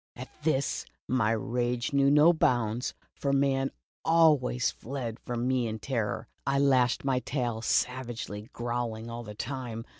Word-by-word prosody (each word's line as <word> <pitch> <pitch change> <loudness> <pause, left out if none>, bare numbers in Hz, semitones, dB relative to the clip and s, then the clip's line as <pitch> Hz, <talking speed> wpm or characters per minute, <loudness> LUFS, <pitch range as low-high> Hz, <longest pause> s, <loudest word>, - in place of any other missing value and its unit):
At 130 +2 -8
this, 145 -3 0 0.2
my 120 -4 +2
rage 120 +3 -1
knew 140 0 +4
no 150 +4 +6
bounds, 120 -6 +1 0.2
for 140 - -1
men 135 -1 +2 0.3
always 150 -7 +4
fled 120 -3 -5
from 120 0 -3
me 130 -2 +1
in 110 0 -3
terror. 110 -2 -2 0.2
I 140 +1 +1
lashed 130 -2 +3
my 130 -2 +2
tail 120 -3 -2
savagely, 120 -4 -1
growling 120 -1 -3
all 120 +1 -5
the 105 -2 -9
time. 120 -2 -5
125 Hz, 145 wpm, -29 LUFS, 115-135 Hz, 0.3 s, no